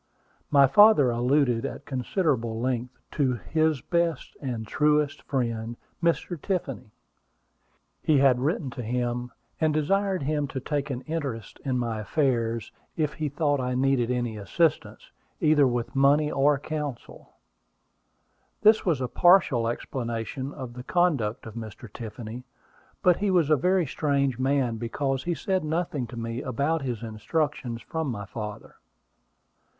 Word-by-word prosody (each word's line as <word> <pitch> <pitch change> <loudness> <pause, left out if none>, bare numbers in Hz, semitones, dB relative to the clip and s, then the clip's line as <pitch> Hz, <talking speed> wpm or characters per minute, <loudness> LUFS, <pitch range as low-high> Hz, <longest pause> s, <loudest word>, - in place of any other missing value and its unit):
My 140 -2 +6
father 145 - +6
alluded 125 0 +2
at - - -5
considerable 130 - -1
length 125 0 -2
to 135 -3 +1
"his 155 +3 0
best 170 -2 -1
and 120 -5 -3
truest 150 +3 +1
friend," 115 -3 -2 0.2
Mr. 170 -1 0
Tiffany. 150 - -3 1.1
He 155 - +3
had 135 -2 +4
written 140 0 -1
to 125 - -6
him, 120 +1 -2 0.3
and 155 -2 +2
desired 190 +3 +1
him 145 0 0
to 135 - -4
take 145 +1 -2
an 130 -2 -3
interest 140 -9 -5
in 130 -2 0
my 115 -3 -2
affairs 115 -1 0 0.3
if 150 -2 0
he 155 -1 -2
thought 145 0 0
I 125 0 -1
needed 130 -2 +2
any 120 -3 -1
assistance, 155 - -1 0.3
either 150 -3 +4
with 120 0 -2
money 145 +3 +4
or 140 +1 +3
counsel. 145 -3 -6 1.3
This 215 +1 +6
was 160 -8 +1
a 125 - 0
partial 170 -9 +4
explanation 120 +2 -4
of 130 -5 -7
the 125 0 -8
conduct 140 -11 +1
of 110 - -8
Mr. 110 -1 -9
Tiffany; 115 +1 -7 0.6
but 180 -2 +5
he 205 0 0
was 170 -5 +3
a - - +7
very 180 +5 +2
strange 140 -3 0
man 130 -3 +1
because 135 +3 -2
he 175 -1 0
said 190 0 -1
nothing 155 -5 -2
to 120 - -9
me 115 +1 -3
about 140 +6 -1
his 120 -4 -4
instructions 115 +2 -2
from 160 +2 -3
my 100 -4 -4
father. 105 0 -7
135 Hz, 145 wpm, -26 LUFS, 120-155 Hz, 1.3 s, a